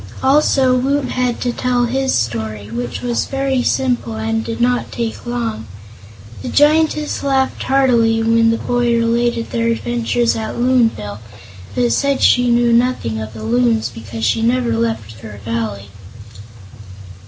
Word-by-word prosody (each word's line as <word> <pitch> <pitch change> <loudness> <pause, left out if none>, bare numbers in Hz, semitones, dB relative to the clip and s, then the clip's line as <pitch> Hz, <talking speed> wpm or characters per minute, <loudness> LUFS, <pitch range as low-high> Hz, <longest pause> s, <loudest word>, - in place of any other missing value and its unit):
Also 265 -2 +3
Woot 270 +2 0
had 250 -1 -1
to 245 -1 -1
tell 245 -1 0
his 265 +2 -1
story, 110 -2 -2
which 120 - -4
was 240 -1 -1
very 270 -1 0
simple 245 -3 0
and 225 0 -2
did 230 0 -5
not 245 +1 0
take 235 0 -4
long. 230 - -3 0.7
The - - -5
Giantess 305 0 +2
laughed 270 -1 0
heartily 235 -4 +2
when 230 0 +3
the 230 - +1
boy 240 0 0
related 230 0 0
their 230 0 0
adventure 240 +1 -1
at 225 -1 -1
Loonville, 230 - +1 0.6
but 245 -1 +1
said 280 -1 +1
she 245 0 +4
knew 235 0 +3
nothing 230 - 0
of 110 0 -7
the 110 - -8
Loons 115 0 +1
because 115 0 -6
she 110 +2 +1
never 120 0 +1
left 110 -1 -3
her 105 -2 -10
Valley. 110 -3 -3
230 Hz, 145 wpm, -17 LUFS, -, 0.7 s, she